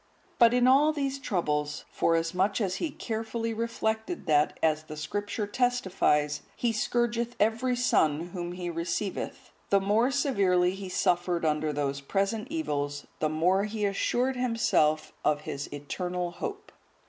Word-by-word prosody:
But 235 -2 +7
in 250 0 +4
all 285 +4 +6
these 275 -2 -2
troubles, 150 - -1
forasmuch 180 +5 +1
as 195 -4 -1
he 335 - -1
carefully 225 -2 -3
reflected 225 +5 -2
that, 150 -3 +2
as 155 -1 +2
the 155 0 -8
Scripture 205 +7 -3
testifies,(154) 195 - +1
"He 235 -2 0
scourgeth 235 +1 0
every 225 +4 +2
son 170 -9 +2
whom 175 -1 -5
He 180 0 -5
receiveth," 170 +4 -3 0.2
the 200 - +5
more 210 +6 +2
severely 200 -11 +2
he 195 -1 -7
suffered 175 -1 +1
under 155 0 +1
those 140 -1 -2
present 200 - -1
evils, 145 - -2
the 155 - +1
more 180 +6 +2
he 215 0 -2
assured 245 +6 0
himself 230 -11 +1
of 150 -1 +2
his 140 -1 -5
eternal 175 +5 -3
hope. 410 - -6
195 Hz, 140 wpm, -28 LUFS, 155-235 Hz, 0.2 s, But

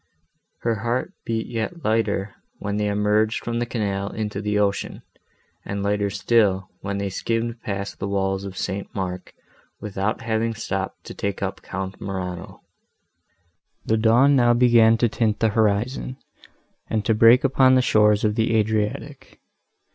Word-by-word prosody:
Her 115 -2 0
heart 120 - -2
beat 115 -1 -1
yet 115 +10 -4
lighter, 105 -2 0 0.2
when 100 0 -3
they 105 0 0
emerged 105 +2 +1
from 120 0 -2
the 120 - -1
canal 100 -4 -2
into 105 -2 -4
the 105 0 -1
ocean, 100 -1 -1 0.6
and 100 0 -4
lighter 100 0 0
still, 100 -2 +1
when 100 0 -4
they 100 -1 -3
skimmed 115 +3 -2
past 100 -1 -5
the 100 - -3
walls 95 -1 -1
of 95 -2 -7
St. 100 +1 -3
Mark, 95 -2 -4 0.5
without 105 0 -2
having 115 0 -1
stopped 95 -3 -4
to - - -9
take 100 -2 -3
up - - -4
Count 95 +1 -6
Morano. 90 -2 -5 1.2
The 110 - +2
dawn 120 +6 +4
now 120 -2 +4
began 115 -2 +5
to 120 - +3
tint 110 -2 0
the 115 - +3
horizon, 110 +4 0 0.7
and 110 -2 -1
to 110 - +3
break 115 +4 +6
upon 130 -1 +4
the 130 - +4
shores 105 -2 +3
of 105 -1 +2
the 115 +1 +1
Adriatic. 110 -1 -2
105 Hz, 155 wpm, -23 LUFS, 100-115 Hz, 1.2 s, break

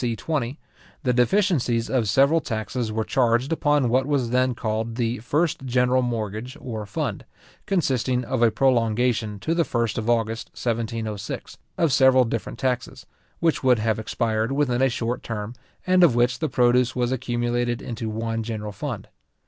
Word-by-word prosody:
c. 120 -2 0
20, 140 +1 -2 0.5
the 125 -3 +2
deficiencies 125 - +2
of 120 -6 0
several 140 +9 +4
taxes 110 0 -3
were 110 +1 -1
charged 120 +3 +1
upon 145 -4 +2
what 130 +3 +2
was 135 -5 0
then 130 0 +2
called 110 0 -2
the 120 0 -1
first 145 +6 0
general 125 0 +2
mortgage 115 0 -3
or 110 -4 -6
fund, 120 -2 -3 0.4
consisting 130 - +1
of 120 +1 -2
a 120 - +6
prolongation 115 -2 +1
to 155 +11 -1
the 170 0 +2
first 115 -5 -1
of 110 +1 -3
August 115 -1 0
1706, 115 -3 -4 0.2
of 160 -5 +2
several 130 -1 +6
different 115 -1 -4
taxes, 130 -2 -2 0.4
which 165 -4 +1
would 125 -2 +5
have 110 0 0
expired 110 +1 -1
within 135 -3 +1
a 135 - +4
shorter 120 0 -2
term, 105 0 -5 0.3
and 185 0 +4
of 150 -9 +5
which 120 0 +2
the 155 - -1
produce 125 0 +3
was 125 -1 0
accumulated 120 -1 -1
into 115 -1 -5
one 115 +1 -2
general 110 -2 -4
fund. 100 - -5
120 Hz, 165 wpm, -24 LUFS, 115-130 Hz, 0.5 s, a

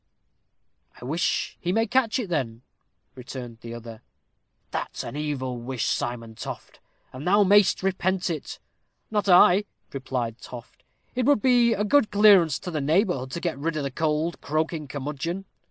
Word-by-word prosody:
"I - - -9
wish 160 +7 -1
he 175 - -1
may 225 +4 +2
catch 240 +1 +1
it, 245 -6 -3
then," 125 -8 -2 0.5
returned 125 -2 -8
the 115 0 -7
other. 115 -1 -10 0.7
"That's - - -4
an - - -7
evil 140 -4 -3
wish, 120 -1 -3
Simon 115 -2 -2
Toft, - - -8 0.3
and 135 +6 -7
thou 205 +3 +5
mayst 195 -2 +4
repent 190 -1 0
it." 155 -4 -5 0.5
"Not 210 -2 0
I," 180 +2 +6 0.3
replied 125 -4 -3
Toft; 120 -2 -11 0.3
"it 250 0 0
would 285 -8 +3
be 245 -2 +4
a 210 - -1
good 220 +1 +3
clearance 195 -8 +5
to 180 - -5
the 155 -3 -2
neighborhood 155 - +1
to 170 - -4
get 170 -6 -3
rid 155 +1 -2
o' 140 -2 -1
th' 135 +3 -8
old 160 +1 0
croaking 155 0 -2
curmudgeon." 150 +7 -4
155 Hz, 160 wpm, -25 LUFS, 130-195 Hz, 0.7 s, I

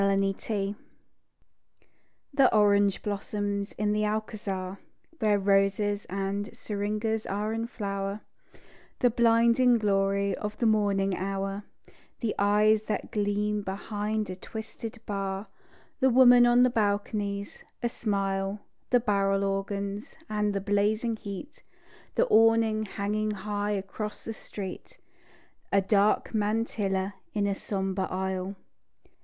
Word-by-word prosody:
SEVILLE 195 +1 0 1.6
The 275 -2 +5
orange 205 -2 +3
blossoms 205 0 -2
in 210 0 0
the 210 0 +1
Alcazar, 205 -3 -3 0.4
Where 210 -2 +3
roses 200 +1 +2
and 195 +2 -2
syringas 215 +1 -2
are 210 +2 -2
in 225 +1 -2
flower; 200 -2 -4 0.8
The 245 - +3
blinding 235 +1 +4
glory 200 -1 +1
of 210 0 -5
the 235 - 0
morning 200 -3 +2
hour; 195 +2 -3 0.5
The 230 -4 -1
eyes 210 +1 +4
that 215 - -3
gleam 210 0 0
behind 205 +1 -3
a - - -5
twisted 220 +3 -8
bar; 195 0 -3 0.5
The 265 - +4
women 245 -1 +7
on 240 +1 +5
the 250 - +4
balconies, 205 -2 -1 0.2
a - - +3
smile; 195 -3 -1 0.3
The 245 - +5
barrel 200 -3 +1
organs, 200 +1 -3
and 210 -1 0
the 195 - 0
blazing 210 +3 +1
heat; 205 +9 -8 0.5
The - - +4
awning 225 - +4
hanging 210 +2 -2
high 205 0 -2
across 205 +2 -5
the 225 - -5
street; 200 -3 -8 0.7
A 200 - +5
dark 200 +3 +2
mantilla 205 -3 0 0.2
in 205 -1 +1
a 200 - +1
sombre 190 -1 -2
aisle. 190 +1 -2
205 Hz, 115 wpm, -28 LUFS, 195-215 Hz, 1.6 s, women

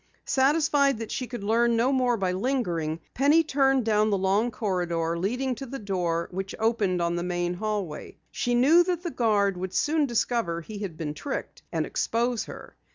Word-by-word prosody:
Satisfied 280 -1 +3
that 225 -1 -6
she 255 - -3
could 240 -4 -6
learn 230 +3 +2
no 240 +4 +2
more 250 -3 +2
by 190 -3 0
lingering, 180 - -1
Penny 290 +5 +4
turned 270 -4 +2
down 215 -1 +3
the 200 - +2
long 195 +5 +1
corridor 175 -6 -1
leading 250 +9 -1
to 270 +3 -7
the 270 +3 -5
door 180 -6 -1
which 190 +1 -4
opened 220 -5 +1
on 170 0 0
the - - -1
main 175 0 -1
hallway. 200 -5 -4
She 245 0 -1
knew 300 +8 +6
that 355 -1 -2
the 345 - -3
guard 205 -6 +1
would 185 +1 -5
soon 305 -1 +2
discover 230 -7 0
he 205 +5 -8
had 190 -6 -5
been 150 -2 -4
tricked 280 - -5
and - - -1
expose 235 0 -1
her. - - -11
220 Hz, 185 wpm, -26 LUFS, 185-260 Hz, -, knew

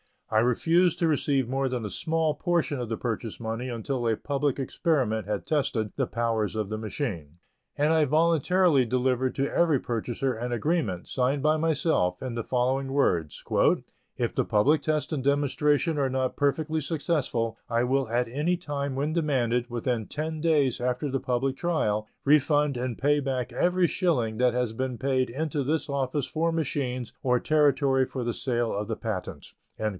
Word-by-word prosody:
I 110 - +4
refused 165 +9 +3
to 170 - +2
receive 140 -4 +1
more 135 +1 0
than 125 -3 -3
a - - -3
small 160 - 0
portion 170 -6 0
of 120 - -3
the 110 0 -3
purchase 115 -2 -4
money 115 +2 -4
until 120 +1 -2
a 115 - +2
public 140 +2 -1
experiment 130 - 0
had 105 -1 -2
tested 120 -8 0
the - - +1
powers 115 -2 -1
of 105 -2 -2
the 110 - -3
machine, 105 - -4 0.4
and 150 +2 +2
I 160 -2 +4
voluntarily 165 0 +3
delivered 130 +1 0
to 140 +1 -1
every 165 -4 +3
purchaser 120 +3 -2
an 120 +2 -4
agreement, 120 - -1
signed 130 +2 0
by 155 +1 +3
myself, 155 - +1
in 130 -2 -4
the 115 -1 -4
following 130 +2 0
words: 85 - 0 0.7
"If - - -1
the - - 0
public 140 +9 +3
test 155 0 -1
and 145 - -1
demonstration 145 +2 +1
are 135 -1 +1
not 130 0 -1
perfectly 155 +2 0
successful, 140 -7 -1
I 115 0 +1
will 135 +1 +1
at 120 +1 0
any 150 +8 0
time 140 -5 -3
when 145 +3 -1
demanded, 125 -7 0
within 120 -2 -2
ten 155 +1 -4
days 150 -6 +2
after 125 +3 -1
the 135 - 0
public 130 +2 -1
trial, 110 -12 0 0.2
refund 145 0 +3
and 125 -1 -3
pay 145 +2 +2
back 130 -3 -2
every 180 0 +2
shilling 135 - 0
that 125 0 +3
has 125 -3 0
been 130 +1 -3
paid 130 -1 0
into 145 +3 -2
this 150 +2 -1
office 140 0 -1
for 165 +1 0
machines 130 -6 -2
or 125 -1 +2
territory 140 -3 +3
for 130 -1 -5
the 120 0 -1
sale 120 -2 -1
of 105 +1 -3
the 110 - -2
patent." 105 -5 -5
130 Hz, 175 wpm, -27 LUFS, 120-150 Hz, 0.7 s, I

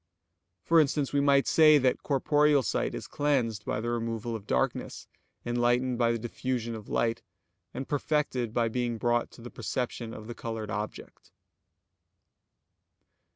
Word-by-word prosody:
For 165 0 +5
instance, 145 -2 +1
we 140 - +3
might 140 -1 +4
say 155 -2 +6
that 130 -2 +1
corporeal 145 0 +3
sight - - -1
is - - -6
cleansed 140 -8 0
by - - -1
the 120 +2 -2
removal 115 -1 -3
of 105 -2 -8
darkness; 65 -1 -1 0.4
enlightened 120 +1 +1
by 115 -1 +3
the 115 - 0
diffusion 120 0 -3
of 110 -2 -8
light; 115 -1 0 0.5
and 135 +1 -6
perfected 145 -5 -1
by 115 0 +1
being 120 0 -2
brought 120 +1 +1
to 115 - -15
the 120 - -8
perception 120 -2 -4
of 110 - -9
the 120 - -6
colored 115 -2 -5
object. 105 +2 -6
120 Hz, 150 wpm, -29 LUFS, 115-140 Hz, 0.5 s, say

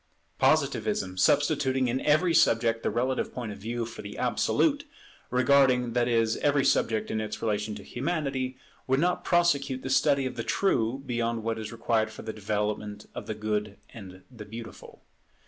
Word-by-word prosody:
Positivism, 95 -1 +1
substituting 135 +1 +2
in 125 +2 -1
every 160 +4 +3
subject 115 -5 +3
the - - 0
relative 125 +4 -1
point 120 -4 -5
of 100 - -9
view 115 +3 -3
for 115 +1 -9
the 105 - -8
absolute, - - +1 0.5
regarding, 125 -1 +3
that 120 -1 +2
is, 115 -2 +2
every 145 -1 +2
subject 110 -1 +1
in 110 - -1
its 110 0 -5
relation 105 -1 -2
to 100 - -9
Humanity, 135 - -2 0.3
would 130 +1 +2
not 180 +3 +1
prosecute 140 -7 +1
the 130 - -3
study 135 +1 +3
of 130 - -4
the 115 - -2
True 135 - 0
beyond 115 -2 -2
what 115 0 -2
is 110 -1 -6
required 115 -1 0
for 110 - -10
the 110 - -5
development 105 0 -3
of - - -7
the 110 - -3
Good 105 -1 -2
and 95 -4 -11
the 115 -4 -9
Beautiful. 115 +2 -10
120 Hz, 170 wpm, -27 LUFS, 110-135 Hz, 0.5 s, every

